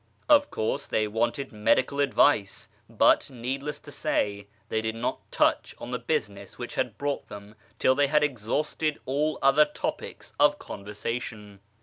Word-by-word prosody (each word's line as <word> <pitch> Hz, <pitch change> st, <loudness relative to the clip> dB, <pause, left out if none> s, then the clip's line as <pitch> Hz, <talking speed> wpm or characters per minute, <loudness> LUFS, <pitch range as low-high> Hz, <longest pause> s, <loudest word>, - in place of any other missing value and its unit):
Of 290 Hz, -1 st, +5 dB
course 110 Hz, -, -2 dB
they 110 Hz, -1 st, +1 dB
wanted 120 Hz, +6 st, -1 dB
medical 125 Hz, +6 st, +1 dB
advice; 140 Hz, -6 st, +2 dB, 0.2 s
but, -, -, +4 dB
needless 135 Hz, +4 st, -4 dB
to 145 Hz, -, -12 dB
say, 100 Hz, -6 st, -1 dB, 0.2 s
they 110 Hz, -, -1 dB
did 110 Hz, 0 st, -2 dB
not 115 Hz, +2 st, -2 dB
touch -, -, +1 dB
on -, -, -8 dB
the -, -, -2 dB
business 100 Hz, -2 st, -3 dB
which -, -, -6 dB
had -, -, -2 dB
brought 145 Hz, -1 st, -2 dB
them 100 Hz, +1 st, -10 dB, 0.2 s
till 130 Hz, -, +4 dB
they 140 Hz, +1 st, +3 dB
had 150 Hz, +1 st, +3 dB
exhausted 150 Hz, +4 st, -1 dB
all 150 Hz, +4 st, 0 dB
other 135 Hz, +3 st, +6 dB
topics 150 Hz, -, -6 dB
of 145 Hz, 0 st, +5 dB
conversation. 105 Hz, -1 st, -6 dB
125 Hz, 150 wpm, -27 LUFS, 105-145 Hz, 0.2 s, other